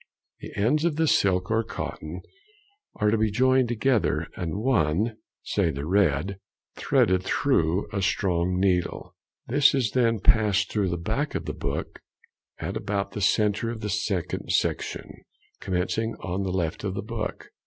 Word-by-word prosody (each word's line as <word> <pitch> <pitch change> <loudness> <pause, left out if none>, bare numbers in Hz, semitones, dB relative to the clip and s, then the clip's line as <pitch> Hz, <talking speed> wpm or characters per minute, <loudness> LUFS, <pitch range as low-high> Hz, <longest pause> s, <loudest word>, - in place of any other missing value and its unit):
The - - -8
ends 135 +10 +2
of 170 -3 +1
the 160 +1 +2
silk 95 -6 +2
or 115 +1 +2
cotton 90 -6 -6 0.7
are 105 0 +2
to 115 - +2
be 110 0 +2
joined 130 +3 +3
together, 120 0 +1
and 85 -2 -3
one, 110 - +1 0.3
say - - +1
the 70 +2 -4
red, 95 0 +1 0.4
threaded 95 0 +2
through 95 - +1
a 100 - -1
strong 90 -2 +1
needle. 90 -2 0 0.3
This 140 +3 +4
is 125 -6 +1
then 115 -3 +2
passed 105 -1 +3
through 100 -3 +1
the 85 - -2
back 85 - -2
of - - -3
the - - -3
book, - - -4 0.6
at - - -4
about 100 0 -2
the 105 - -5
centre 105 +3 +2
of 115 -1 -5
the 105 - -2
second 100 -4 -2
section, - - -1 0.5
commencing 100 +5 -1
on 95 +1 -4
the 95 - -2
left 85 -2 -2
of 95 -2 -2
the - - -3
book. 110 0 -5
100 Hz, 160 wpm, -26 LUFS, 90-115 Hz, 0.7 s, This